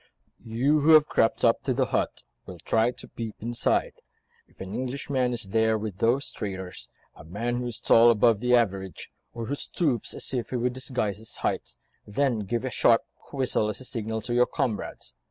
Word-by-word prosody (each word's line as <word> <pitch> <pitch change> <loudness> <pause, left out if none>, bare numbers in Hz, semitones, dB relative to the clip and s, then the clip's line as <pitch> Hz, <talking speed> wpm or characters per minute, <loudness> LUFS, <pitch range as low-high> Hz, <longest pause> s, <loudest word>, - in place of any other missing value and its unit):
"You, 130 +7 +1
who 155 +2 +5
have 155 -1 +8
crept 115 - +2
up - - +3
to - - -1
the - - +2
hut, - - -2 0.2
will - - -8
try 115 +1 +1
to 125 - -9
peep 115 -2 -6
inside. 120 +1 0 0.5
If - - -26
an 95 +1 -7
Englishman 130 0 -1
is 120 -1 -2
there 110 +3 +1
with 105 -3 -6
those 120 +5 +1
traitors, 95 -4 -6 0.3
a - - -13
man 115 +9 -3
who 125 0 -3
is 120 - -5
tall 115 +1 +6
above 115 -1 +4
the 125 +1 +3
average, 95 -5 -1 0.2
or 115 -1 -6
who 135 - -3
stoops 145 - -1
as - - -2
if 125 -3 -2
he - - -4
would 125 +1 0
disguise 125 -6 -2
his 110 - -5
height, - - -2 0.3
then 120 +2 0
give 115 +5 -2
a 130 - -3
sharp, 115 -1 +4
quick 140 - -7
whistle 110 -4 +1
as 105 - -3
a 130 - -7
signal 110 -2 -3
to 120 +1 -3
your 125 0 +4
comrades. 110 -6 -3
115 Hz, 200 wpm, -26 LUFS, 110-125 Hz, 0.5 s, have